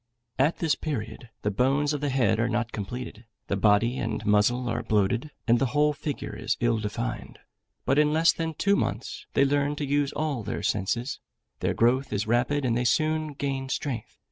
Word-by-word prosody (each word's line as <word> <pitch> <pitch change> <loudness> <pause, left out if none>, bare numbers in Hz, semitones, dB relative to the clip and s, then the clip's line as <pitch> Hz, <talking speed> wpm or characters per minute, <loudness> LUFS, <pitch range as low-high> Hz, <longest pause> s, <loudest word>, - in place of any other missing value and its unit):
At 145 +5 +3
this 160 -3 +1
period, 120 -6 -5
the 105 - +1
bones 135 +7 +2
of 145 - -3
the 145 - 0
head 125 -4 +2
are 115 +2 +1
not 120 -1 -1
completed, 115 +2 -6 0.2
the - - -1
body 105 +5 +3
and 105 - -3
muzzle 110 +4 +3
are 115 - -1
bloated, 110 +7 +1 0.2
and 120 0 +4
the 135 - +2
whole 150 0 +4
figure 145 0 -5
is - - -1
ill 120 -1 +2
defined; 115 +3 -4 0.5
but 135 +2 +3
in 150 0 +4
less 160 +2 +4
than 160 -1 -3
two 200 +6 +2
months, - - -3
they 140 - +5
learn 145 +1 +1
to 145 - -3
use 145 0 +1
all 150 -5 -1
their 105 - -4
senses; 115 +6 -1 0.4
their - - 0
growth 130 +4 +2
is 105 0 -1
rapid, 125 +5 +1
and 120 -2 +1
they 120 - +1
soon 155 +4 +1
gain 135 -1 -3
strength. 135 -6 -4
130 Hz, 195 wpm, -27 LUFS, 115-145 Hz, 0.5 s, they